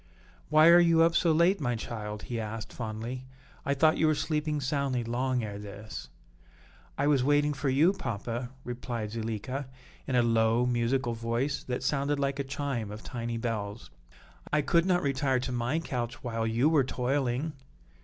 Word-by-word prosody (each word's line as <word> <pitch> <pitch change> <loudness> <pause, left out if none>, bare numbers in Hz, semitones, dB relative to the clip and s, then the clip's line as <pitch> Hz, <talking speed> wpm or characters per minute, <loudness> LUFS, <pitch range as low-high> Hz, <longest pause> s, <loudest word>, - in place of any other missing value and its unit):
"Why 155 +1 +7
are 170 +1 +9
you 165 -1 +5
up 165 0 +3
so 170 - +4
late, 170 +4 +3
my 120 -3 0
child?" 105 -2 -5
he 120 -2 -4
asked, 110 0 -5
fondly. 120 +3 -5 0.4
"I 140 - 0
thought 155 +3 +4
you 160 - +4
were 155 - +3
sleeping 150 -1 -1
soundly 135 -2 0
long 125 +1 -1
ere 105 -1 -5
this." 100 - -8 0.9
"I 140 - +1
was 145 -3 +3
waiting 145 +1 +3
for 140 0 -1
you, 155 +8 +4
papa," 120 - -4
replied 120 -3 -4
Zuleika, 115 +4 -4 0.4
in 130 - 0
a 120 - +5
low, 115 +1 +3
musical 120 +1 +1
voice, 115 +5 -1
that 125 -1 -3
sounded 140 +1 +1
like 140 0 -1
a - - +1
chime 135 -5 -3
of 105 +1 -8
tiny 120 -2 -4
bells; 110 - -4 0.6
"I 150 - +2
could 170 +5 +3
not 180 -1 +2
retire 135 -1 +1
to 130 0 -3
my 125 +5 0
couch 120 -7 -4
while 115 -2 -1
you 115 +5 +2
were 155 -3 +4
toiling." 130 +3 -1
130 Hz, 175 wpm, -29 LUFS, 115-145 Hz, 0.9 s, are